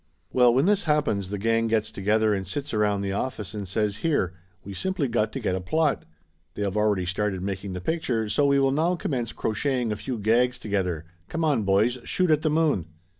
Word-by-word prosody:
Well, 125 -1 +6
when 130 +5 +3
this 205 +1 +2
happens 145 - +1
the 105 - -3
gang 115 +2 +1
gets 110 -1 0
together 105 +2 +2
and 95 -1 -3
sits 145 -1 -4
around 105 -2 +1
the 100 -1 -2
office 105 -1 -3
and 105 -2 -5
says 105 +2 -1
here, 110 - 0 0.3
we 100 - -8
simply 180 - -1
got 110 -2 0
to 135 - -3
get 105 -6 -1
a 95 - -2
plot; 155 - 0 0.5
they 105 - -2
have 100 -1 -2
already 105 -3 +2
started 95 0 -2
making 95 0 -4
the 90 - -5
pic 160 - -1
ture, 115 -6 -1
so 140 +7 +2
we 140 0 +4
will 135 -1 +3
now 165 +6 +2
commence 125 -8 -2
crocheting 120 +1 -1
a - - -1
few 125 +3 -4
gags 120 +4 +2
together, 90 -6 -2 0.2
come 165 0 -1
on, 145 -7 +2
boys, 105 +6 +2
shoot 180 +4 +1
at 155 -1 +3
the 155 - +1
moon 150 - +1
110 Hz, 220 wpm, -25 LUFS, 100-140 Hz, 0.5 s, Well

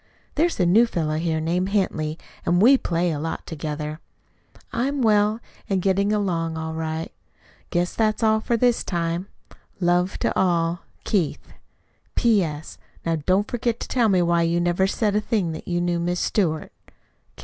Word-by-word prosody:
There's 330 -1 +1
a 180 - +4
new 215 +7 +5
fellow 155 -7 -1
here 160 -1 0
named 175 +4 0
Henty, 160 -6 0 0.3
and 175 +1 +2
we 245 +8 +7
play 175 -7 0
a 150 - -3
lot 160 +2 -4
together. 150 0 -5 0.7
I 235 +3 0
am 280 -2 -1
well, 210 0 +3 0.3
and 195 -2 +2
getting 195 +2 +1
along 170 -6 0
all 160 0 -4
right. 160 0 -3 0.6
Guess 175 +1 0
that's 220 0 +1
all 220 0 +4
for 230 +2 0
this 245 0 +2
time. 170 +1 -2 0.5
Love 180 +1 +1
to - - 0
all. 170 -2 +1 0.2
KEITH 185 -8 -1 0.6
P.S. 175 -10 +1 0.3
Now 165 -1 +1
don't 195 +3 +3
forget 235 -1 -1
to - - -5
tell 235 -4 +2
me 185 -3 +3
why 170 0 +2
you 170 +1 +1
never 175 +2 +2
said 210 +1 0
a 210 - +2
thing 205 -6 0
that 160 - -8
you 175 -1 0
knew 175 -1 0
Miss 175 +1 -1
Stewart. 160 -7 0
175 Hz, 170 wpm, -23 LUFS, 165-210 Hz, 0.7 s, we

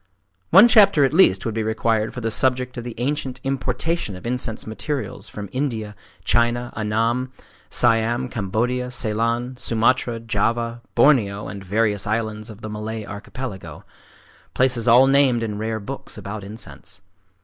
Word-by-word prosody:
One 195 +7 +8
chapter 200 -10 +6
at 135 - -1
least 155 - +4
would 115 - -2
be 110 - -1
required 110 0 0
for 125 - -7
the 115 0 -1
subject 125 +1 +1
of 120 - -5
the 120 -1 -7
ancient 130 0 -2
importation 135 - -2
of 90 - -11
incense 120 -2 -1
materials 135 +6 -5
from 105 -1 -7
India, 115 -6 -3 0.3
China, 120 +2 +1
Annam, 115 +4 0 0.4
Siam, 115 +2 +2
Cambodia, 120 +4 -2
Ceylon, 120 +1 -1
Sumatra, 115 0 +1
Java, 115 +2 -1
Borneo, 105 -8 +3
and 100 -1 -7
various 105 0 0
islands 110 0 -2
of 110 0 -11
the 110 - -6
Malay 110 0 -5
archipelago,—places 120 +2 -5
all 120 +3 +7
named 135 -3 +3
in 105 -2 -4
rare 110 0 -2
books 100 - -7
about 105 +1 -6
incense. 100 -2 -10
115 Hz, 140 wpm, -22 LUFS, 110-125 Hz, 0.4 s, One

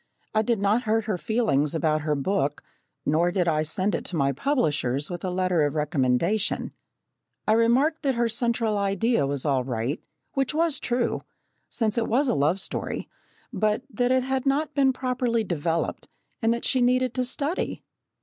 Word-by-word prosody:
I 215 - +3
did 225 -1 0
not 215 +5 +2
hurt 220 0 +1
her 205 -5 -2
feelings 160 - +1
about 155 -1 +1
her 150 0 0
book, 145 -1 -1 0.4
nor 165 +4 +2
did 180 -1 0
I 155 -2 +2
send 185 +6 0
it - - -1
to 180 - -3
my 140 -3 +2
publishers 145 - 0
with 175 -1 -5
a 185 - -1
letter 180 -2 +1
of 145 0 +1
recommendation. 150 - +1 0.8
I - - +4
remarked 250 +8 +3
that 270 -3 +1
her 235 0 +2
central 230 -2 0
idea 200 - +1
was 140 0 -3
all 135 -3 +2
right, 125 +4 -2 0.3
which 270 +2 0
was 325 -2 +2
true, 240 -1 -1 0.5
since 225 -1 0
it 225 - -1
was 270 +5 +2
a - - +2
love 150 +7 +2
story, - - -4 0.5
but 215 +3 +1
that 245 0 +1
it 260 0 +3
had 265 +1 -1
not 290 +3 +1
been 270 -2 +4
properly 250 -3 0
developed 165 -3 -2 0.3
and 225 0 +3
that 235 0 -1
she 260 - +3
needed 250 0 +2
to 255 - 0
study. 285 +7 -3
215 Hz, 180 wpm, -25 LUFS, 155-245 Hz, 0.8 s, I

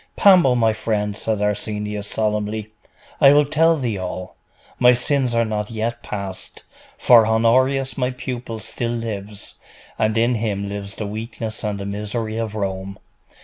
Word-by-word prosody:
'Pambo, 180 -10 +6
my 115 -2 +3
friend,' 105 -2 -2
said 105 -1 -1
Arsenius 105 0 -2
solemnly, 105 0 -2 0.5
'I 140 -2 +7
will 145 0 +5
tell 160 +3 +3
thee 120 -8 -2
all. 90 0 -6 0.4
My 125 0 +7
sins 125 0 +1
are 115 0 +3
not 105 -1 -3
yet 115 +1 -3
past; 100 -2 -6 0.3
for 115 -3 +6
Honorius, 130 +5 +2
my 125 -1 +1
pupil, 125 -3 -5
still 115 +2 -3
lives, 105 -3 -5 0.4
and 110 0 +1
in 120 +2 +3
him 105 -3 -2
lives 100 0 -6
the 110 - -4
weakness 110 +1 -5
and 105 -2 -2
the 100 - -5
misery 105 +2 -3
of 110 -2 -3
Rome. 95 -1 -4
110 Hz, 150 wpm, -21 LUFS, 105-120 Hz, 0.5 s, I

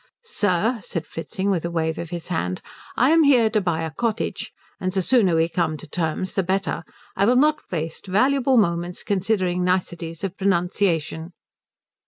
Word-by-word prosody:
"Sir," 220 - 0
said 165 -2 -4
Fritzing, 190 +6 -3
with 175 -4 0
a 170 - -2
wave 160 -1 -1
of 170 - -5
his 175 0 -6
hand, 90 - -2 0.3
"I 255 +5 +4
am 325 0 +6
here 250 -7 +5
to 215 -1 +2
buy 170 -3 -1
a 160 - -3
cottage, 225 +6 -2 0.3
and 185 0 -1
the 190 0 0
sooner 200 -7 +3
we 165 0 +3
come 170 -2 -1
to 160 - -10
terms 165 +3 -2
the 195 - +1
better. 190 -1 -1 0.3
I 200 - +2
will 245 +4 +4
not 300 +3 +3
waste 165 +1 -4
valuable 260 +6 +3
moments 175 -3 0
considering 185 -3 0
niceties 175 -2 -2
of 195 -1 -3
pronunciation." 175 -3 0
185 Hz, 175 wpm, -23 LUFS, 165-210 Hz, 0.3 s, am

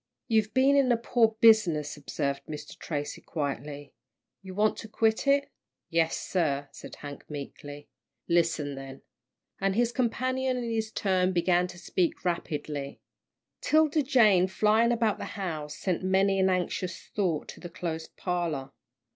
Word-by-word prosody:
"You've 220 -2 +2
been 270 +2 +5
in 270 -3 +4
a 240 - +4
poor 230 -1 +2
business," 175 -10 +5
observed 140 -1 -3
Mr. 150 -1 -7
Tracy, 145 -2 -4
quietly. 145 -1 -5 0.5
"You 190 -1 -9
want 210 +1 +2
to 225 - -7
quit 220 +4 +1
it?" 280 0 +3 0.4
"Yes, 165 -1 +2
sir," 145 -6 -1
said - - -10
Hank, 145 -1 -10
meekly. 145 0 -8 0.4
"Listen 165 -4 +1
then 135 0 -9 0.3
" - - -41
and 195 0 +1
his 240 +1 +2
companion 255 +1 0
in 235 -2 -3
his 220 -1 -1
turn 185 -3 +1
began 180 0 +2
to 180 -1 -11
speak 175 0 -1
rapidly. 150 -5 -3 0.6
'Tilda 310 0 +3
Jane, 220 - +4
flying 215 +4 +3
about 225 -3 +1
the - - -4
house, 155 -6 -4
sent 185 -3 -1
many 190 +1 +2
an 190 0 +4
anxious 185 0 -1
thought 175 -7 -2
to - - -9
the 175 - -8
closed 165 -2 -5
parlour. 165 -7 -2
185 Hz, 150 wpm, -28 LUFS, 150-220 Hz, 0.6 s, been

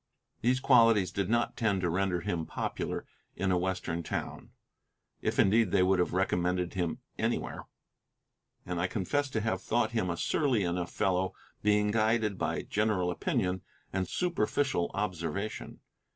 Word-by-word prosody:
These 125 +2 +2
qualities 115 -8 +5
did 100 -1 -1
not 120 +1 +1
tend 100 -5 +1
to 90 - +1
render 90 0 0
him 80 -1 -2
popular - - -3 0.3
in 95 0 0
a 90 - +3
Western 90 -2 -2
town, - - -5 0.7
if - - -1
indeed 110 +1 +4
they 90 - +3
would 95 0 +3
have 90 - +1
recommended 90 -1 0
him 85 -3 -1 0.2
anywhere, - - -2 1.0
and 90 -1 -2
I 90 - +2
confess 140 +10 -1
to 110 -4 -1
have 105 -4 -1
thought 120 +4 +1
him 110 -6 0
a 85 - -2
surly 130 - +1
enough 85 0 -2
fellow, 95 -1 0 0.3
being 105 0 +3
guided 110 -2 +1
by - - -1
general 105 -4 +1
opinion 95 -2 -1 0.3
and 95 -1 0
superficial 140 - 0
observation. 100 +1 -3
95 Hz, 150 wpm, -30 LUFS, 90-110 Hz, 1.0 s, qualities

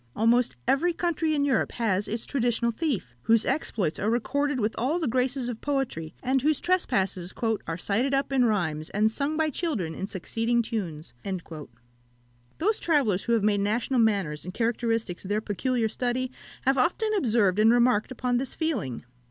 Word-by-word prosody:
Almost 235 +2 +3
every 340 +6 +3
country 325 -2 0
in 285 -1 +1
Europe 270 -5 +1
has 205 -4 0
its 225 +1 -3
traditional 240 -3 0
thief, 230 - -2
whose 225 - +4
exploits 200 - -1
are 210 - 0
recorded 285 +4 0
with 215 0 0
all 270 +8 0
the 330 -4 -1
graces 255 +1 0
of 235 -2 -5
poetry, 265 - -2
and 260 +1 +2
whose 300 +1 +2
trespasses 195 - 0 0.4
"Are 165 - -2
cited 220 +9 0
up 275 0 0
in 260 -2 +4
rhymes, 165 -9 0
And 215 +2 +2
sung 285 +6 -1
by 315 -1 +1
children 245 - -2
in 190 - -4
succeeding 225 +5 0
tunes." 180 - -4
Shakspeare's 195 - -3
Rape - - -21
of - - -23
Lucretia. 155 -3 -7 0.9
Those 420 +6 +1
travellers 265 - +2
who 235 - +1
have 225 -3 +2
made 205 -1 +3
national 230 +5 0
manners 195 -9 +1
and 180 +1 -7
characteristics 225 -5 -1
their 205 +2 -1
peculiar 225 +3 -1
study, 250 +3 -2 0.3
have 270 0 +2
often 430 - +1
observed 220 - +2
and 220 +1 +6
remarked 240 -3 +3
upon 250 -1 0
this 265 +1 -3
feeling. 240 - -2
235 Hz, 180 wpm, -27 LUFS, 205-270 Hz, 0.9 s, and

